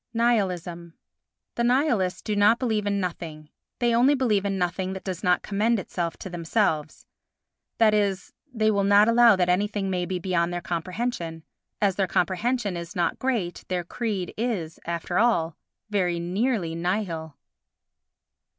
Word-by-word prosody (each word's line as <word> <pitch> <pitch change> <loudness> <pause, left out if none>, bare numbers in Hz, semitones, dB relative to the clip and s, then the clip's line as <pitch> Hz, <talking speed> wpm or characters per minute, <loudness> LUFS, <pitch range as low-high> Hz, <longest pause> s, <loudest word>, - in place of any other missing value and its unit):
Nihilism 180 -7 0 0.6
The 235 - -1
Nihilists 240 - +1
do 210 - -2
not 205 +3 +5
believe 220 -5 -1
in 200 0 +1
nothing; 160 -4 -5 0.3
they 240 -1 +1
only 255 +5 +5
believe 215 -7 +1
in 195 -1 -1
nothing 185 +1 -1
that 190 - -7
does 185 -3 -5
not 180 -1 +2
commend 215 +3 +1
itself 175 -3 -3
to - - -7
themselves; 165 -3 -1 0.7
that 220 -2 +5
is, 200 -2 0 0.2
they 220 -3 +2
will 200 -1 +1
not 205 +2 +5
allow 230 -1 +6
that 180 -1 +1
anything 195 +1 0
may 180 -1 -1
be 185 - -2
beyond 175 -1 0
their 175 - -2
comprehension. 170 0 -3 0.4
As 195 -3 +1
their 195 -2 +1
comprehension 200 +4 0
is 170 0 -7
not 175 - 0
great 230 -10 -2
their 180 -1 -1
creed 200 -1 -3
is, 200 -10 -2
after 170 +1 -1
all, 170 -9 +2 0.4
very 180 -4 +1
nearly 185 0 -1
nihil. 170 -3 -3
190 Hz, 150 wpm, -25 LUFS, 175-220 Hz, 0.7 s, allow